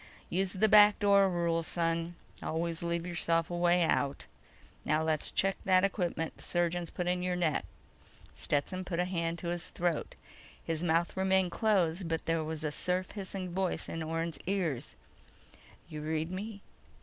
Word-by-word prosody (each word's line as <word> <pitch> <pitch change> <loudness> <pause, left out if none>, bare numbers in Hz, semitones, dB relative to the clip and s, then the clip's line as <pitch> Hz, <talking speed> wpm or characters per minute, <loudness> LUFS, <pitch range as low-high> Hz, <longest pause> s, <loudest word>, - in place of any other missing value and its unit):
"Use 190 +1 0
the 210 +3 +3
back 210 0 +7
door 200 -2 +5
rule, 170 -2 +1
son. 165 +1 -1 0.3
Always 165 +1 -2
leave 170 0 -2
yourself 165 -1 0
a - - -2
way 175 0 +3
out. 140 -3 0 0.6
Now... 155 +1 +1
let's 155 -1 +1
check 195 0 +1
that 185 -1 +4
equipment 175 -5 -1
the - - -13
surgeons 175 -1 -1
put 180 - -4
in 180 0 0
your 180 0 0
neck." 170 -4 0 0.7
Stetson 165 +6 -1
put 180 -2 -4
a 180 - +2
hand 170 -2 -2
to 170 0 -4
his 175 -1 -3
throat. 170 -3 -2 0.5
His 165 0 -2
mouth 170 0 +1
remained 190 -1 +2
closed, 185 -5 +1
but 165 0 -2
there 165 -1 +1
was 155 0 -4
a 150 - -1
surf 180 +4 -1
hissing 190 -2 -5
voice 185 0 -1
in 165 - -4
Orne's 165 -1 -3
ears: 175 -10 -1 0.9
"You 155 -3 -7
read 160 +2 -2
me?" 200 +2 -6
175 Hz, 165 wpm, -31 LUFS, 165-185 Hz, 0.9 s, back